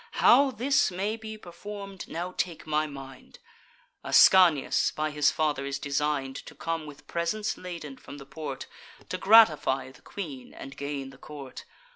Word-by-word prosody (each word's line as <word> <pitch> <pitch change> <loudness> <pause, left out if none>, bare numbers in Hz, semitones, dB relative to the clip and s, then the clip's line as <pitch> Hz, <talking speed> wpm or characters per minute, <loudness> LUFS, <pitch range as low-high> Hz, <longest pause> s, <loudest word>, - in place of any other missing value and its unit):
How 275 +3 +6
this 265 +2 +2
may 195 +4 -2
be 220 -1 -8
perform'd, 195 +1 -9
now 175 +2 -5
take 170 -3 -3
my 155 0 0
mind: 135 -2 -11 0.7
Ascanius 175 -7 +5
by 155 0 -2
his 150 -1 +3
father 150 -3 0
is 140 0 -3
design'd 140 -1 -1
To - - -11
come, 165 -2 -3
with 145 -1 -12
presents 210 +6 -2
laden, 170 -7 -8
from 140 - -11
the 135 - -11
port, 140 -1 -6 0.4
To 185 - -3
gratify 195 -12 +5
the 130 - -19
queen, 145 -11 -8
and 135 - -9
gain 140 -1 -5
the 135 - -17
court. 140 -3 -10
155 Hz, 155 wpm, -28 LUFS, 140-190 Hz, 0.7 s, How